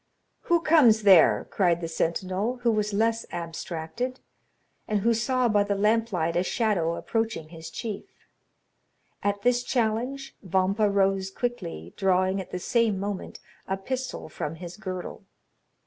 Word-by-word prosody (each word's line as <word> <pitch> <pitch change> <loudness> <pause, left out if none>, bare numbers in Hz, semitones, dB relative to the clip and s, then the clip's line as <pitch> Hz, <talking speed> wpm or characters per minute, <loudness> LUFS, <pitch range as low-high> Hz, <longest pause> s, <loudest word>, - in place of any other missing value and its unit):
"Who 340 -1 +3
comes 270 -10 +5
there?" 190 -5 +6
cried 175 -4 +2
the 165 - -4
sentinel, 185 +8 -1
who 235 - +4
was 210 -1 0
less 225 +2 +1
abstracted, 170 +8 -4 0.7
and 210 -2 0
who 230 +3 +3
saw 250 +2 +1
by 210 -2 +3
the 200 0 -1
lamp 220 +3 +2
light 165 -3 0
a 175 - +3
shadow 185 -4 0
approaching 225 -9 -2
his 165 -1 -9
chief. 220 -4 -5 1.2
At 205 0 -1
this 245 0 +3
challenge, 245 +3 -1
Vampa 195 +2 +1
rose 195 -1 +1
quickly, 90 - -4
drawing 190 0 +2
at 185 - -10
the - - -4
same 220 +1 +1
moment 200 -1 -5 0.3
a 190 - -1
pistol 255 +6 -4
from 155 0 -5
his 175 +1 -8
girdle. 185 -1 -6
200 Hz, 145 wpm, -26 LUFS, 180-230 Hz, 1.2 s, there